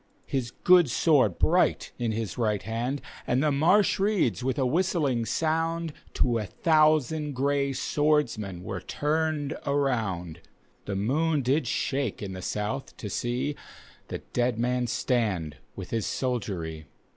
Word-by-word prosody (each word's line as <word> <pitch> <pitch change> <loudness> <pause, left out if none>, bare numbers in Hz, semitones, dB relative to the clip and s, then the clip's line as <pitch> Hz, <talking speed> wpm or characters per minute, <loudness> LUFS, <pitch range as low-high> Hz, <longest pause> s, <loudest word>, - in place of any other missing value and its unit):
His 130 -3 -2
good 175 +4 +5
sword 130 - +3
bright - - +2
in 120 -2 0
his 110 -3 -3
right 105 -4 0
hand, 120 +6 -2 0.2
And 130 +3 +2
the 150 - +3
marsh 180 +11 +3
reeds 190 - +1
with 130 +2 -1
a 135 - +2
whistling 145 -5 +1
sound. 165 0 0 0.2
To 120 -2 +2
a 105 - -3
thousand 155 - +2
gray 140 +1 +1
swordmien 130 - 0
were 95 0 -5
turned 155 -1 -1
around. 110 - -1 0.5
The 100 - -3
moon 145 +8 +1
did 135 +2 +1
shake 135 -3 -1
in 95 -2 -5
the 95 - -6
soudi 105 +8 -3
to 105 - -6
see, 125 +7 -1 0.5
llie - - -5
dead 120 -1 +1
man 125 +1 0
stand 105 - -1 0.2
with 95 -2 -8
his 115 -3 -1
soldiery. 90 - -3
125 Hz, 140 wpm, -27 LUFS, 110-150 Hz, 0.5 s, good